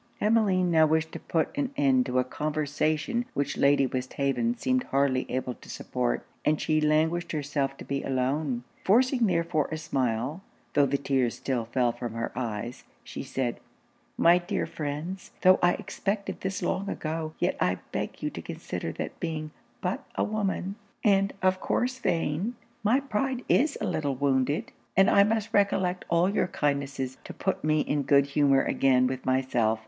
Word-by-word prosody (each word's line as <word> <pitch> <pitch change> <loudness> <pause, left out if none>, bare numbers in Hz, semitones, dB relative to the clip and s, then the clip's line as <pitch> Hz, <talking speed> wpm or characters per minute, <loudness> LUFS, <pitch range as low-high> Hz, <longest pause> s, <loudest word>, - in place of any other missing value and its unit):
Emmeline 200 -5 +3
now 160 -1 +5
wished 160 +1 +1
to - - -6
put 165 - -1
an 280 -2 0
end 265 -3 +3
to 125 - -1
a 130 - +4
conversation 155 - -1
which 145 +1 -1
Lady 140 0 +4
Westhaven 140 - -1
seemed 255 +2 +1
hardly 135 -2 +1
able 130 0 -2
to - - -16
support; - - -2 0.2
and 150 0 +2
she 155 -1 +1
languished 160 +3 +1
herself 140 -2 -1
to - - -9
be 140 0 -2
alone. 130 0 -1 0.2
Forcing 245 +3 +4
therefore 170 -4 +1
a 160 - -2
smile, 130 +1 -1 0.3
tho' 145 -1 +4
the 140 +1 +1
tears 135 -3 0
still 125 -4 -2
fell 120 +1 +1
from 120 -1 -6
her 115 - -2
eyes, 120 0 -4 0.2
she - - -7
said 125 -3 -2 0.6
'My 170 +1 +6
dear 180 +4 -2
friends, 155 +5 -5
tho' 185 0 +7
I 175 0 +5
expected 200 0 -3
this 190 +1 -3
long 200 +1 -1
ago, 155 0 -3
yet - - +1
I - - +2
beg - - -4
you - - -1
to - - -7
consider - - -5
that - - -6
being 155 -1 -3 0.3
but - - -2
a - - +1
woman, 200 -2 -2 0.3
and 195 -2 +4
of 185 0 +3
course 255 +5 -1
vain, 175 - 0 0.3
my 235 +6 +3
pride 260 0 -2
is 285 +2 +3
a - - -2
little 155 -7 -1
wounded, 135 +1 +1 0.3
and 195 +1 +6
I 200 - +7
must 215 0 0
recollect 190 -3 +2
all 170 +1 +3
your 195 -2 +1
kindnesses, 140 -4 -2
to - - -9
put 190 - -2
me 155 0 +3
in 145 0 0
good 140 0 +4
humour 140 -1 +3
again 130 -2 +3
with 130 0 -3
myself. 125 -4 +1
155 Hz, 170 wpm, -28 LUFS, 135-195 Hz, 0.6 s, tho